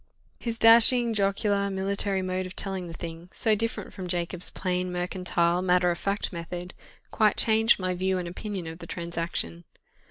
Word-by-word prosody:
His 230 -1 -4
dashing, 230 +1 +6
jocular, 200 0 +1
military 195 0 0
mode 185 0 -2
of 185 - -11
telling 190 -3 -1
the - - -8
thing, 165 +1 -8
so 220 - +2
different 225 +2 -3
from 185 -1 -6
Jacob's 175 0 -1
plain, 180 -1 -2
mercantile, 180 -1 0
matter 180 -1 +3
of 170 - -4
fact 200 0 -2
method, 175 +1 -6 0.4
quite 215 -2 +2
changed 220 0 +5
my 185 -1 -1
view 185 +1 0
and 180 -1 -4
opinion 190 +1 -5
of 165 +1 -8
the - - -9
transaction. 170 - -4
185 Hz, 165 wpm, -27 LUFS, 175-200 Hz, 0.4 s, dashing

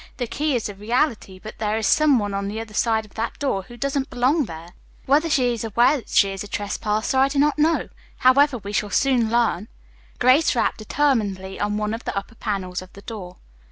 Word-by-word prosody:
The 245 - -2
key 290 +4 -1
is 235 - -1
a 205 - -7
reality, 215 -1 -1
but 215 +3 -11
there 215 0 0
is 220 - -1
some 300 +4 +4
one 205 -3 -2
on 200 0 -2
the 210 +2 -4
other 225 -1 -8
side 220 0 +1
of 210 - -20
that 225 +1 -4
door 265 -9 -1
who 240 +5 -13
doesn't 275 +1 -2
belong 265 +5 +1
there. 165 -2 -9 0.4
Whether 300 +5 +3
she 255 -5 +2
is 230 - -5
not 225 -2 -6
aware 245 +6 +4
that 245 - -11
she 195 - +3
is 195 0 -5
a - - -9
trespasser 210 +4 -1
I 270 - +5
do 275 +1 -4
not 295 +1 +2
know. 320 +2 +2 0.3
However, 270 +1 +4
we 200 -2 -7
shall 210 0 0
soon 245 0 +2
learn." 225 -4 +1 0.5
Grace 255 +4 +4
rapped 235 - 0
determinedly 210 -7 -1
on 210 0 -1
one 210 0 -1
of 230 - -5
the - - -3
upper 200 +3 -5
panels 195 -5 -3
of 185 - -13
the 200 - -13
door. 185 -5 -8
225 Hz, 225 wpm, -22 LUFS, 205-265 Hz, 0.5 s, I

